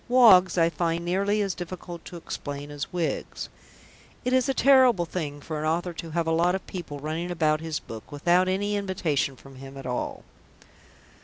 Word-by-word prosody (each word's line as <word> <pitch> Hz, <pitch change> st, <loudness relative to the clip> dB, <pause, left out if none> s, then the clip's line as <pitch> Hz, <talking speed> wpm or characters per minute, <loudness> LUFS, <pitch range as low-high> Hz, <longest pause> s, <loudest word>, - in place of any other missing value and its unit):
Woggs 190 Hz, -8 st, +7 dB
I 165 Hz, 0 st, +4 dB
find 170 Hz, 0 st, -1 dB
nearly 200 Hz, +4 st, +1 dB
as 195 Hz, -2 st, -1 dB
difficult 175 Hz, -1 st, -7 dB
to -, -, -9 dB
explain 145 Hz, -3 st, -6 dB
as 145 Hz, -1 st, -5 dB
Wiggs; 175 Hz, -3 st, -3 dB, 0.8 s
it 250 Hz, -, +1 dB
is 260 Hz, +1 st, +3 dB
a -, -, +3 dB
terrible 255 Hz, -9 st, +5 dB
thing 150 Hz, -4 st, -4 dB
for 155 Hz, +1 st, -5 dB
an 155 Hz, -, -1 dB
author 175 Hz, +2 st, -1 dB
to 165 Hz, 0 st, -7 dB
have 165 Hz, +1 st, -1 dB
a 165 Hz, -, 0 dB
lot 170 Hz, +3 st, +3 dB
of 190 Hz, -, -5 dB
people 170 Hz, -6 st, -6 dB
running 160 Hz, +4 st, -3 dB
about 155 Hz, -3 st, +1 dB
his 160 Hz, -2 st, -3 dB
book, 110 Hz, -1 st, -10 dB
without 175 Hz, +5 st, +3 dB
any 205 Hz, +2 st, 0 dB
invitation 170 Hz, -9 st, -1 dB
from 135 Hz, 0 st, -15 dB
him 135 Hz, +1 st, -10 dB
at 135 Hz, -, -8 dB
all. 125 Hz, -1 st, -3 dB
170 Hz, 185 wpm, -26 LUFS, 155-185 Hz, 0.8 s, Woggs